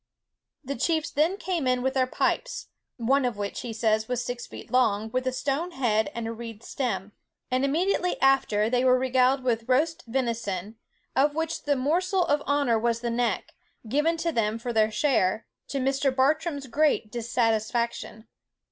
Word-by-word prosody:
The 280 +1 -3
chiefs 320 +5 0
then 320 +7 +1
came 350 -8 -2
in 250 -1 +1
with 265 0 +1
their 260 -1 +2
pipes, - - -1 0.3
(one 265 +4 +2
of 245 -4 -1
which, 205 -1 -4
he 240 - -5
says, 220 0 +1
was 245 -1 -2
six 245 0 -5
feet - - -11
long, 220 -4 +2
with 255 +1 -1
a - - +2
stone 285 +7 -2
head 230 -2 +1
and 235 -1 -3
a - - -3
reed 230 -1 -8
stem;) 205 -7 -3 0.4
and 255 +1 +1
immediately 355 +5 +1
after 265 -6 +3
they 250 +2 +1
were 255 0 +5
regaled 260 +1 +2
with 230 -1 -1
roast 310 +6 +2
venison, 225 -5 -2 0.4
of 290 +2 +3
which 325 0 -2
the 290 -1 +2
morsel 355 +7 +1
of 290 -2 +1
honour 285 -6 +2
was 230 0 0
the 240 -1 -2
neck, 240 0 -1 0.3
given 300 +8 +1
to 335 +1 -1
them 225 -5 0
for 235 +1 -4
their 220 -1 +3
share, 220 -4 +1 0.2
to 275 - -3
Mr. 270 +1 +1
Bartram's 290 +2 +1
great 280 -4 +1
dissatisfaction. 230 -1 -1
255 Hz, 175 wpm, -26 LUFS, 230-285 Hz, 0.4 s, were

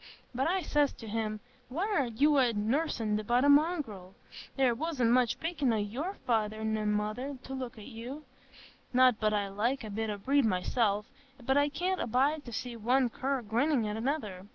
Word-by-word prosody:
But 260 +4 0
I 370 +1 +1
says 295 -2 +2
to 225 - -11
him, 215 -1 -3 0.3
'Why, 325 +10 -1
what 420 -1 +1
are 270 - +1
you 275 +7 +2
yoursen 225 -2 0
but 245 +5 +2
a - - +5
mongrel? 285 - +2 0.4
There 265 -3 +3
wasn't 255 -3 0
much 245 -1 +2
pickin' 315 -6 0
o' 225 - +1
your 250 - -3
feyther 215 -3 +1
an' 215 -1 0
mother, 215 +7 -2
to 265 - -7
look 260 -2 -5
at 210 - -10
you.' 260 +5 -8 0.7
Not 255 -2 +5
but 215 -1 +2
I 205 -1 0
like 235 +7 -1
a 215 - -6
bit 220 +2 -2
o' 205 - -3
breed 275 +7 +2
myself, 210 +1 +1 0.4
but 265 - +2
I 285 +1 +3
can't 360 +6 -1
abide 280 +6 +1
to 240 - -8
see 235 +2 -4
one 245 +2 +2
cur 265 0 -2
grinnin' 235 +3 +1
at 210 0 -2
another. 220 -6 -3
245 Hz, 190 wpm, -30 LUFS, 215-280 Hz, 0.7 s, a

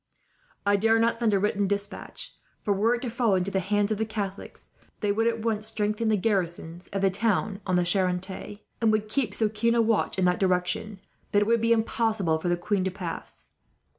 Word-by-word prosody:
"I 200 0 +4
dare 225 +2 +3
not 230 0 +2
send 230 -2 +2
a 200 - +3
written 205 0 +1
despatch 200 +1 -4 0.3
for, 205 - +2
were 220 +5 +2
it 240 - -6
to 250 - -2
fall 230 -4 +2
into 185 +1 0
the 190 - +1
hands 205 +2 0
of 215 - -1
the - - +2
Catholics, 205 -3 -6 0.3
they 205 -2 +1
would 225 +3 +1
at 230 -1 0
once 220 -2 0
strengthen 215 0 0
the 215 -1 +3
garrisons 175 -4 -2
of 195 0 -3
the 195 - +4
town 205 0 0
on 185 - +2
the 180 -1 +2
Charente; 190 +2 -1 0.2
and 225 -1 +4
would 215 0 0
keep 220 -3 -1
so 220 - +2
keen 225 +2 +1
a - - +3
watch, 225 -3 +1
in 185 - +2
that 180 0 +2
direction, 185 +3 0 0.4
that 205 0 +5
it - - -4
would 230 0 +3
be 230 0 +2
impossible 220 -7 +1
for 175 - -2
the 175 - +2
queen 185 +2 0
to 190 - 0
pass. 180 -3 -7
205 Hz, 220 wpm, -27 LUFS, 190-225 Hz, 0.4 s, that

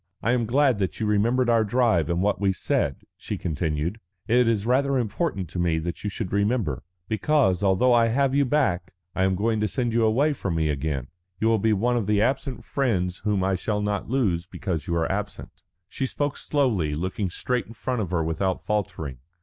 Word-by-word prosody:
"I 115 - +2
am 120 -2 +1
glad 130 -2 +3
that 95 - -2
you 110 - 0
remembered 115 +5 +2
our 115 -2 +4
drive 105 - +2
and 85 +2 0
what 100 -2 0
we 95 -1 +2
said," 70 -5 -1
she - - -5
continued. 80 +4 -2 0.3
"It 120 +1 +4
is 110 -3 +1
rather 135 +3 +2
important 115 - -1
to 90 - -5
me 85 -2 +1
that 85 +2 -4
you 105 - -1
should 95 -1 -5
remember. 100 - 0 0.3
Because, 110 - +2
although 100 +6 +3
I 115 -1 +5
have 135 +4 +2
got 140 - +1
you 140 - +4
back, 95 - 0 0.2
I 95 - +1
am 95 0 +2
going 110 +3 0
to 105 - +1
send 120 +3 -1
you 115 0 +3
away 135 +8 +3
from 100 -10 -3
me 80 -1 +1
again. 70 -3 -2 0.3
You 110 - +2
will 115 -1 +3
be 110 +2 +2
one 120 +4 +1
of 110 -4 -1
the 105 -1 +3
absent 130 +3 -1
friends 95 -10 -1
whom 105 -3 0
I 95 +1 +1
shall 105 +3 -1
not 105 0 -2
lose 95 -10 0
because 90 -5 -4
you 85 - 0
are 80 -1 0
absent." 105 +1 -5 0.3
She 130 +7 -3
spoke 145 +2 -2
slowly, 110 - 0
looking 95 +4 -2
straight 125 +7 -2
in 115 - -11
front 125 +1 -2
of 95 - -3
her 85 -2 0
without 85 +4 -1
faltering. 80 -11 -3
105 Hz, 215 wpm, -25 LUFS, 90-120 Hz, 0.3 s, I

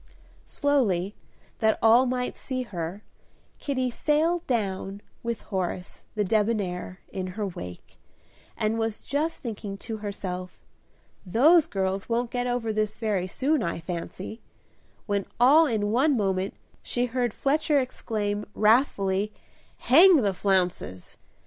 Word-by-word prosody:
Slowly, 210 - +1 0.5
that 220 0 +3
all 235 +3 +6
might 250 0 -2
see 255 -1 -4
her, 185 -2 -5 0.6
Kitty 260 -3 -1
sailed 320 +6 +1
down, 200 -4 -2 0.2
with 235 -1 -3
Horace, 180 -2 -4
the 210 - +1
debonair, 200 -3 -1
in 185 -1 -4
her 210 - -1
wake, 90 - -8 0.6
and 215 +1 0
was 225 -1 -2
just 310 +3 -1
thinking 210 -4 -5
to 220 +2 -5
herself, 185 -3 -6 0.6
"Those 290 - +5
girls 195 +1 -2
won't 235 +1 0
get 245 -1 -1
over 240 -3 -1
this 215 0 -1
very 205 -5 -1
soon, 280 +8 +1
I 170 -3 -2
fancy," 180 +5 -6 0.6
when 200 -2 -1
all 295 +6 +7
in 210 -4 0
one 265 +4 +3
moment 195 -2 0 0.3
she 245 0 -1
heard 245 -1 -1
Fletcher 295 +5 +1
exclaim, 210 -5 -3
wrathfully, 210 -3 +2 0.5
"Hang 340 +9 +7
the 200 -2 +1
flounces!" 180 - -1
215 Hz, 125 wpm, -26 LUFS, 195-250 Hz, 0.6 s, all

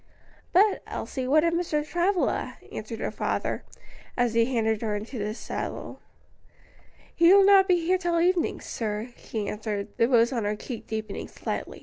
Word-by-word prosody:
"But, 400 +4 +4
Elsie, 260 -2 -4
what 305 +3 +4
of 335 0 +2
Mr. 325 -4 0
Travilla?" 355 +3 0
asked - - -6
her - - -3
father, - - -2 0.5
as 245 -2 +2
he 230 0 +4
handed 220 -3 0
her 215 -2 -1
into 220 +4 -5
the 210 +1 -3
saddle. - - -5 1.1
"He 340 +1 +5
will 395 0 +7
not 390 -1 +7
be 350 -3 +2
here 370 +2 +2
till 345 -2 +1
evening, 350 0 +1
sir," 215 +1 -4
she 215 -3 -5
answered, 210 -1 -3
the 230 - +4
rose 240 0 +4
on 235 -3 -1
her 205 +1 0
cheek 230 +2 -7
deepening 220 -1 -4
slightly. - - -5
255 Hz, 165 wpm, -26 LUFS, 220-345 Hz, 1.1 s, will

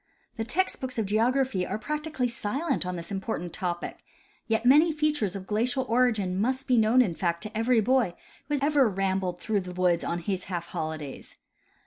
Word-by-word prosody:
The 225 - -2
text 355 +12 -1
books 255 -1 -4
of 220 - +1
geography 230 0 +1
are - - -2
practically 300 +2 -2
silent 235 - -2
on 180 - -2
this 170 +2 -6
important 190 -3 -3
topic; 175 -3 -3 0.5
yet 225 +1 0
many 300 +6 +6
features 295 - 0
of 190 -1 -6
glacial 245 +6 0
origin 220 -6 +2
must 260 +4 -1
be 250 -3 +4
known 225 +4 +5
in 190 -8 -2
fact 170 +1 -1
to 215 0 -8
every 225 +1 +3
boy 240 -5 +2 0.3
who 295 0 0
has 290 +2 0
rambled 190 -7 +1
through 210 0 0
the 180 -1 -7
woods 180 -1 +2
on 170 - -1
his 185 +2 -3
half 175 -2 -4
holidays. 155 -3 -5
220 Hz, 180 wpm, -27 LUFS, 185-255 Hz, 0.5 s, many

